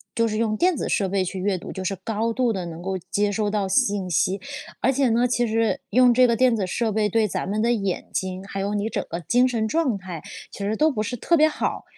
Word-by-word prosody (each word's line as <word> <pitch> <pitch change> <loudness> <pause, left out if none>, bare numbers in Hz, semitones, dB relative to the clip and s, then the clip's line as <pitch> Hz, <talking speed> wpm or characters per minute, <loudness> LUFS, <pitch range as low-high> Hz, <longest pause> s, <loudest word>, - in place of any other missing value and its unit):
就 230 0 +2
是 215 -1 -2
用 215 -1 0
电 360 -1 +3
子 - - -3
设 195 - +1
备 190 0 0
去 185 +1 -4
阅 190 0 0
读， - - -8
就 190 - -5
是 195 +1 -1
高 225 +1 -1
度 245 0 +1
地 190 -4 -3
能 170 0 -7
够 190 +1 -2
接 205 0 +1
收 210 0 0
到 205 -2 0
信 200 -3 +1
息。 185 +3 +1 0.4
而 265 - +3
且 270 0 +2
呢， 235 +2 +3
其 240 0 +1
实 225 0 +1
用 250 0 +5
这 250 +1 +5
个 235 - +2
电 250 -1 +3
子 200 - -1
设 225 +4 -1
备 210 0 +1
对 215 +1 +2
咱 - - -3
们 210 +2 -1
的 235 +2 +2
眼 200 -5 -2
睛， 185 0 -3
还 195 0 -6
有 200 +1 -1
你 205 +1 -1
整 - - -3
个 170 - -4
精 245 +10 +3
神 230 -3 -1
状 275 -5 +1
态 185 -4 -8 0.3
其 - - -11
实 200 +2 -1
都 310 +7 +3
不 215 -6 -2
是 245 - -3
特 340 +9 +2
别 310 0 +6
好。 310 - -2
215 Hz, 285 characters per minute, -23 LUFS, 195-240 Hz, 0.4 s, 别